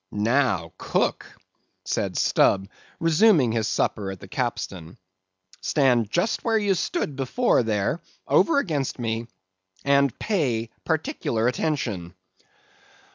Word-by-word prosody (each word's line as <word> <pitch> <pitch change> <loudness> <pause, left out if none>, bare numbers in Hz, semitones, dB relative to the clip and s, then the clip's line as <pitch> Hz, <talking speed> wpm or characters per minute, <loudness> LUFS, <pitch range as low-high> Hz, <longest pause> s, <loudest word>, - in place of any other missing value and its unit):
"Now, 105 -6 +1
cook," - - -1 0.6
said - - -2
Stubb, 95 0 +3 0.3
resuming 165 - +4
his 110 -1 0
supper 105 -2 -1
at 95 -1 -7
the - - -11
capstan; 85 -2 -4 0.6
"stand 125 -7 +2
just 175 - 0
where 225 -1 +2
you 205 -2 +2
stood 150 -5 -2
before, 135 - +2
there, 110 - -1 0.3
over 325 -3 +4
against 155 - -1
me, 115 -1 -3 0.6
and 140 -2 +3
pay 125 - -1
particular 160 - -1
attention." 115 - -2
125 Hz, 110 wpm, -24 LUFS, 110-160 Hz, 0.6 s, resuming